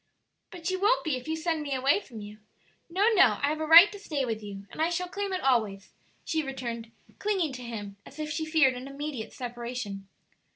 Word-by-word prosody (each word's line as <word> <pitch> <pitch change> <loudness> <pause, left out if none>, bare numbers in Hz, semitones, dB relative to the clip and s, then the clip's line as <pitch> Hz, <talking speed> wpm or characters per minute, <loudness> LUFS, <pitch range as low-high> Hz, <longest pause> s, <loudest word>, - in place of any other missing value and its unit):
"But 355 0 -4
you 375 0 -2
won't 435 +5 +3
be 315 -5 0
if 255 +3 -7
you 320 - -1
send 320 -1 -1
me 285 -2 -2
away 270 +7 +3
from 235 - -10
you. 210 +1 -10 0.5
No, 390 +6 +3
no; 245 - +5
I 285 - +3
have 310 +1 -2
a 315 - -2
right 335 +5 +10
to 410 - -9
stay 295 -8 -2
with 225 -2 -3
you, 200 -1 -8
and - - -5
I 325 - +3
shall 360 +1 -2
claim 400 +2 -3
it 370 - -2
always," 215 -7 0 0.3
she 320 - 0
returned, 240 -5 -5 0.3
clinging 380 -9 0
to 250 - -7
him 205 -4 -7
as 280 - -14
if 305 -1 -4
she 320 - -2
feared 315 -4 +4
an 250 +2 -7
immediate 275 -4 -5
separation. 240 -5 -6
280 Hz, 220 wpm, -28 LUFS, 235-330 Hz, 0.5 s, right